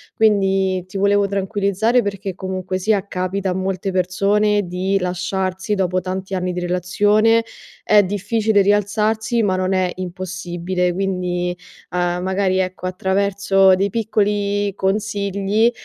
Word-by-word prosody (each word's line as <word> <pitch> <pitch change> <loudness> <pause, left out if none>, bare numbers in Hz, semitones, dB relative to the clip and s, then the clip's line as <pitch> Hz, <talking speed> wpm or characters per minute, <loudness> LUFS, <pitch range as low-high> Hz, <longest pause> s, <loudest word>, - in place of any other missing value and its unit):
Quindi 195 -3 +2
ti 195 - -7
volevo 200 0 +3
tranquillizzare 200 +4 +1
perché 200 -2 -4
comunque 185 -1 -4
sia 205 0 +1
capita 185 +1 -2
a - - 0
molte 190 0 -2
persone 200 +3 +1
di 185 +2 0
lasciarsi 185 +2 -2
dopo 185 -1 0
tanti 190 +1 -5
anni 180 0 -1
di 180 - -3
relazione, 205 +6 +2 0.4
è 210 -1 +5
difficile 205 +2 +1
rialzarsi 215 +3 +1
ma 190 -2 +1
non 185 0 -1
è 185 -1 +1
impossibile. 180 -1 -3
Quindi, 180 -2 -2 0.4
uhm, 175 0 -1
magari 190 0 0
ecco, 185 0 -2
attraverso 195 0 +2
dei 195 +1 0
piccoli 205 -2 0
consigli, 200 +2 0
195 Hz, 125 wpm, -20 LUFS, 185-205 Hz, 0.4 s, è